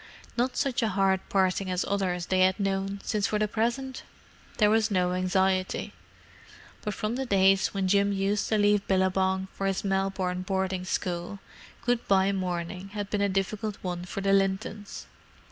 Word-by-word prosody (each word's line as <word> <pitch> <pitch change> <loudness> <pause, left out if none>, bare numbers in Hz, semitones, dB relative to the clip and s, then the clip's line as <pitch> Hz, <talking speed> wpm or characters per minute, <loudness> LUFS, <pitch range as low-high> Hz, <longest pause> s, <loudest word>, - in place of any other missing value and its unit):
Not 250 +1 0
such 265 -3 0
a 225 - +2
hard 190 -1 +2
parting 190 0 +1
as 180 0 0
others 185 -3 -1
they 185 +1 +1
had 185 +1 +3
known 195 0 -1
since 210 -2 0
for 210 - 0
the 210 0 +1
present 240 +5 -2 0.6
there 210 -1 +4
was 220 0 +3
no 180 -3 +1
anxiety: 185 0 0 0.9
but 210 - -3
from 215 +3 -2
the 265 - -2
days 195 -2 +4
when 195 -2 -2
Jim 200 +1 +3
used 200 +1 0
to 220 - +2
leave 205 -1 +3
Billabong 190 0 +1
for 195 - -2
his 195 -1 -1
Melbourne 190 -2 -1
boarding 190 -1 -2
school, 180 +1 -3 0.5
good 240 -1 0
bye 195 0 +4
morning 180 0 -3
had 205 -1 -4
been 205 - 0
a 200 - +2
difficult 200 +2 -2
one 175 -1 -3
for 185 +2 -5
the 195 0 +2
Lintons. 195 +1 -1
195 Hz, 170 wpm, -28 LUFS, 185-205 Hz, 0.9 s, there